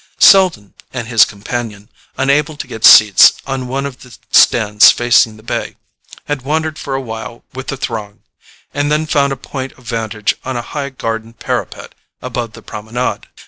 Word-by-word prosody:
Selden 175 - +4 0.2
and 120 -3 -5
his 115 -2 +5
companion, 105 0 -6 0.3
unable 145 +3 +1
to - - -6
get 110 - -9
seats 105 -2 +8
on 135 -2 -4
one 135 +2 -3
of 135 -3 -7
the 125 -5 -14
stands 105 -3 +5
facing 120 -2 +3
the 110 - -17
bay, - - -4 0.5
had 145 -2 -3
wandered 155 +3 -2
for 135 - -4
a - - -1
while 115 -1 -8
with 130 0 -8
the 135 - -4
throng, 110 -5 -6 0.5
and 145 +1 -1
then 155 +1 +1
found 140 -2 +1
a - - -1
point 130 +1 -7
of 125 - -21
vantage 110 -2 -2
on 130 -1 -4
a 120 - -4
high 140 +2 -5
garden 115 -3 -5
parapet - - -5 0.3
above 120 -3 -5
the - - -13
Promenade. 110 +4 -4
125 Hz, 175 wpm, -15 LUFS, 110-140 Hz, 0.5 s, seats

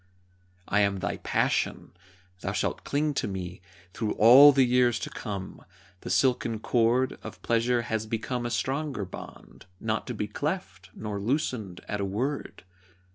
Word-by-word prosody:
I 105 - +2
am 100 -1 +2
thy 95 - -3
Passion. - - -1 0.5
Thou 95 +1 -3
shalt 105 - -2
cling 150 +1 0
to - - -1
me 90 -2 -6 0.3
Through 110 -2 -2
all 130 +7 +9
the 135 -1 +4
years 125 -2 +3
to - - -5
come. 100 -3 -6 0.4
The - - -8
silken 115 +3 +2
cord 120 +3 +1
Of - - -10
Pleasure 120 +1 +1
has 110 -2 -2
become 115 +3 -2
a - - -3
stronger 135 -1 -2
bond, 95 - -11
Not 110 0 -2
to 125 - -4
be 105 - -2
cleft, 105 - -4
nor 105 -2 -4
loosened 110 - -2
at 105 -1 -2
a - - 0
word. 125 +9 -3
115 Hz, 155 wpm, -27 LUFS, 100-130 Hz, 0.5 s, all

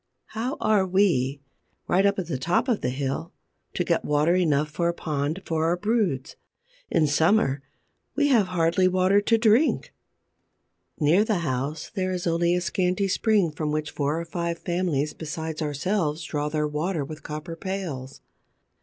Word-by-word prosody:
How 245 +6 -3
are 210 -3 +3
we, 175 -8 +1 0.5
right 190 +3 +3
up 200 - +1
at 190 - -2
the 150 -6 -3
top 175 - +1
of 235 -5 +1
the - - 0
hill, 135 +5 -3 0.4
to - - +1
get - - 0
water 150 +3 +2
enough 150 -5 +2
for 170 +3 0
a 170 - -2
pond 155 +4 -2
for 160 -1 0
our 170 +2 +1
broods? 195 - -1 0.5
In 155 - +3
summer, 145 -1 +2 0.5
we 290 0 +2
have 225 -8 +4
hardly 175 +1 +2
water 185 +2 +3
to 225 +2 +3
drink! 225 +6 +2 1.1
Near 165 +7 +4
the 215 -5 0
house 140 +3 -3
there 185 -2 -1
is 180 -1 -3
only 170 +1 +2
a 180 - 0
scanty 185 +2 0
spring 200 -3 +2
from 150 0 -3
which 155 0 -2
four 145 +2 -1
or 170 - -4
five 170 0 -3
families 170 -5 -1
besides 160 0 -5
ourselves 155 +2 -1
draw 150 -1 -2
their 150 0 0
water 150 +1 -2
with 155 +2 -9
copper 155 +2 -6
pails. 165 -8 -5
170 Hz, 165 wpm, -25 LUFS, 150-190 Hz, 1.1 s, have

